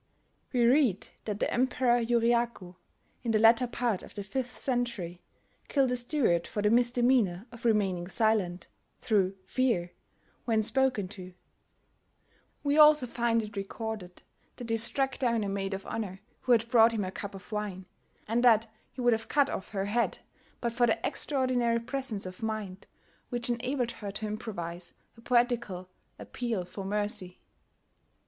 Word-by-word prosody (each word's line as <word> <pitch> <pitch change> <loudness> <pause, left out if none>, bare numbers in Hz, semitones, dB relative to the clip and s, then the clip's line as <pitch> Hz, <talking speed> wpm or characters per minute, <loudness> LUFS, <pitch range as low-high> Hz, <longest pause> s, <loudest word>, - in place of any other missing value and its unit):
We 245 -2 +3
read 245 -6 +3 0.2
that 210 -1 -3
the - - 0
Emperor 250 -1 +2
Yuriaku, 235 -5 +1 0.5
in 235 - -4
the 220 - +3
latter 225 +3 +5
part 240 -4 -1
of - - -12
the 205 - -4
fifth 250 +5 -4
century, 235 -9 -2 0.5
killed 270 -3 +2
a - - +1
steward 240 - +2
for 205 - -3
the 210 - +3
misdemeanour 240 -5 +3
of 235 0 -12
remaining 195 -6 +1
silent, 195 -4 +1 0.3
through 195 -4 +1
fear, 190 -7 0 0.5
when 220 -2 +2
spoken 255 -4 +2
to: 185 -2 -9 1.3
we 290 +1 +2
also 300 -3 +8
find 235 -1 0
it 210 0 -9
recorded 200 -2 -6 0.3
that 240 -2 -6
he 225 - +2
struck 265 +4 +2
down 235 -4 +1
a 200 - -2
maid 195 0 -2
of 195 - -8
honour 195 -3 -5 0.2
who 250 - -2
had 230 -1 +4
brought 230 -1 +6
him 210 -3 -1
a 185 - -4
cup 200 0 -7
of 195 +2 -12
wine, 205 -3 -4 0.4
and 230 +3 +1
that 230 -2 +6 0.3
he 255 - -7
would 245 -1 +4
have 225 0 -3
cut 285 -2 +3
off - - -5
her 195 -2 -2
head 230 +4 0 0.4
but 235 -1 -1
for 240 0 +3
the 225 - +2
extraordinary 255 -4 +1
presence 240 -4 -3
of 185 0 -8
mind 215 -4 -4 0.4
which 240 0 0
enabled 245 +1 -1
her 210 -3 -7
to 205 +2 -3
improvise 180 -5 -5 0.2
a 230 - -16
poetical 235 -7 0 0.3
appeal 230 -7 -3
for 195 +2 -8
mercy. 200 -2 -3
225 Hz, 160 wpm, -29 LUFS, 195-245 Hz, 1.3 s, also